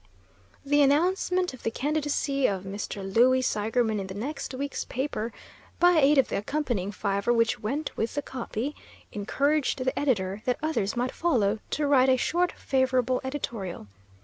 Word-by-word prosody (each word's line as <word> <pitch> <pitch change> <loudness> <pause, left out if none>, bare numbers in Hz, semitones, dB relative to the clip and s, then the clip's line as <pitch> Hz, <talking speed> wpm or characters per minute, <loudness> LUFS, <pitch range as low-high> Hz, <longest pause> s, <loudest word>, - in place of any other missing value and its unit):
The 290 +1 +3
announcement 360 +4 +2
of 255 - -11
the - - -1
candidacy 285 +1 0
of 190 -2 -2
Mr. 200 0 -5
Louis 245 +7 +4
Seigerman 220 -1 0
in 195 - -4
the 190 - -7
next 275 +7 -4
week's 280 +2 -3
paper 250 -4 -3 0.5
(by 350 -2 +5
aid 290 +1 +5
of 270 - +4
the - - -1
accompanying 220 -4 -2
fiver 200 +2 -1
which 230 -1 +2
went 275 +8 -3
with 225 - -2
the 290 - -1
"copy") 255 +2 -4 0.4
encouraged 280 +7 0
the 260 +1 -1
editor, 200 -8 0
that 250 - +1
others 230 -10 -1
might 245 +1 0
follow, 225 -11 +1
to 295 - -1
write 265 -2 +4
a 260 - +4
short, 350 +6 +1
favorable 255 -1 +1
editorial. 235 - -4
255 Hz, 160 wpm, -27 LUFS, 215-290 Hz, 0.5 s, by